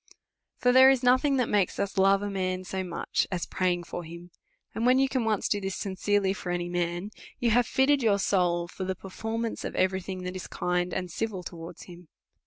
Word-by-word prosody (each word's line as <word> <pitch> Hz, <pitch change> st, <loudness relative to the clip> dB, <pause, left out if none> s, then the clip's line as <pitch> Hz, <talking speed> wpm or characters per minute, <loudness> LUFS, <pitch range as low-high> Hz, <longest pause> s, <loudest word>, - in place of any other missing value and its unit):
For 250 Hz, -, +3 dB
there 260 Hz, +1 st, +8 dB
is 265 Hz, -2 st, +2 dB
nothing 260 Hz, +3 st, +4 dB
that 250 Hz, -, +1 dB
makes 200 Hz, -3 st, +1 dB
us 200 Hz, -, -2 dB
love 195 Hz, +1 st, +4 dB
a 205 Hz, -, -2 dB
man 185 Hz, -1 st, -2 dB
so 190 Hz, 0 st, -4 dB
much, 175 Hz, -2 st, -1 dB
as 180 Hz, -2 st, -2 dB
praying 180 Hz, -1 st, 0 dB
for 175 Hz, -, -6 dB
him; 170 Hz, +2 st, -11 dB, 0.4 s
and, 225 Hz, -, -3 dB
when 250 Hz, +1 st, +5 dB
you 270 Hz, 0 st, +4 dB
can 260 Hz, -3 st, -1 dB
once 215 Hz, -3 st, +1 dB
do 205 Hz, -, 0 dB
this 195 Hz, 0 st, -3 dB
sincerely 195 Hz, 0 st, 0 dB
for 180 Hz, -3 st, -5 dB
any 175 Hz, 0 st, -2 dB
man, 175 Hz, +3 st, -2 dB, 0.3 s
you 240 Hz, -3 st, +1 dB
have 240 Hz, +1 st, +3 dB
fitted 275 Hz, +1 st, +3 dB
your 215 Hz, -4 st, +3 dB
soul 175 Hz, -3 st, +1 dB
for 185 Hz, -, -7 dB
the 190 Hz, 0 st, -2 dB
perform 225 Hz, +5 st, -4 dB
ance 225 Hz, -, -5 dB
of -, -, -5 dB
every 190 Hz, 0 st, +1 dB
thing 185 Hz, 0 st, -6 dB
that 180 Hz, +1 st, -5 dB
is 185 Hz, -, -6 dB
kind 180 Hz, 0 st, -1 dB
and 180 Hz, -1 st, -3 dB
civil 200 Hz, -1 st, -3 dB
towards 170 Hz, 0 st, -9 dB
him. 175 Hz, -1 st, -13 dB
190 Hz, 220 wpm, -28 LUFS, 180-225 Hz, 0.4 s, there